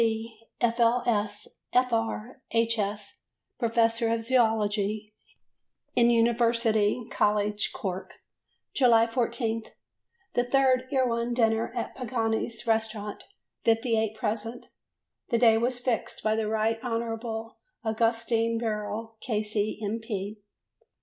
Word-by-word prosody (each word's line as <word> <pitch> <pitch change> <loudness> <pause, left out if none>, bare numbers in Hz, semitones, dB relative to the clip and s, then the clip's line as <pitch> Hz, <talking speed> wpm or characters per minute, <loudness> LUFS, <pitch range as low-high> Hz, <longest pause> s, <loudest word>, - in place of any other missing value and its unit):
Sc., 225 0 -2
F.L.S., 230 -3 +1 0.3
F.R. 240 0 0
H.S., 215 -3 -1 0.4
Professor 230 -1 +2
of 230 0 0
Zoology 215 -3 +1 0.8
in 235 0 +5
University 230 -1 +2
College, 210 0 +1
Cork. 190 -1 -5 0.6
July 235 -4 +5
14. 230 -1 -1 0.7
The 245 - +2
third 255 0 +3
Erewhon 240 -3 +1
dinner 225 -1 +2
at 235 - -3
Pagani's 230 -2 -2
Restaurant; 220 -2 -1 0.4
58 225 -2 +2
present: 225 +2 -4 0.6
the 235 - +2
day 230 -1 +6
was 245 +2 0
fixed 245 -2 -2
by 215 0 +2
the 220 -1 -1
Right 220 +1 +1
Honourable 230 -1 -3 0.2
Augustine 230 0 +1
Birrell, 220 0 -3
K.C., 215 -2 -1
M. 210 +3 -1
225 Hz, 95 wpm, -28 LUFS, 220-235 Hz, 0.8 s, day